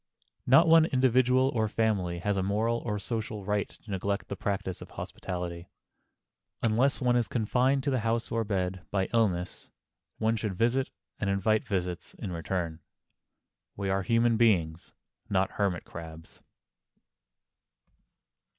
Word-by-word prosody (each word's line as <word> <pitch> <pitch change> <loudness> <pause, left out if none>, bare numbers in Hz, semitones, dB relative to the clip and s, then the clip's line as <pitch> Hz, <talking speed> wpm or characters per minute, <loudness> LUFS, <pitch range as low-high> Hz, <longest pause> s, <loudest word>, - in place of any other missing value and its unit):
Not 135 +7 +7
one 165 -1 +7
individual 130 -1 +3
or 110 -4 0
one - - -3
family 100 -6 0
has 100 +2 0
a 95 - 0
moral 110 +5 0
or 105 -3 -3
a - - -3
social 105 -1 -4
right 105 0 0
to 110 - -13
neglect 100 +2 -2
the 100 - -3
practise 95 -2 -3
of - - -9
hospitality. 90 -1 -6 0.9
Unless 120 +6 +2
one 125 -1 +3
is 120 -2 +2
confined 130 +4 +1
to 140 - 0
the 130 - +1
house 115 +1 -1
or 115 0 +1
bed 95 -3 -2
by 95 -1 0
illness, 95 -6 0 0.5
one 110 +1 +1
should 105 -3 -3
visit 120 +6 +1 0.3
and 100 - -1
invite 100 +3 +1
visits 90 -3 -3
in 100 - -6
return. 85 -1 -3 1.0
We 100 -1 -2
are 95 0 +1
human 115 +3 +2
beings, 90 -8 +2 0.4
not 95 -1 +1
hermit 95 -4 -1
crabs. 80 -1 -10
105 Hz, 145 wpm, -29 LUFS, 95-115 Hz, 1.0 s, Not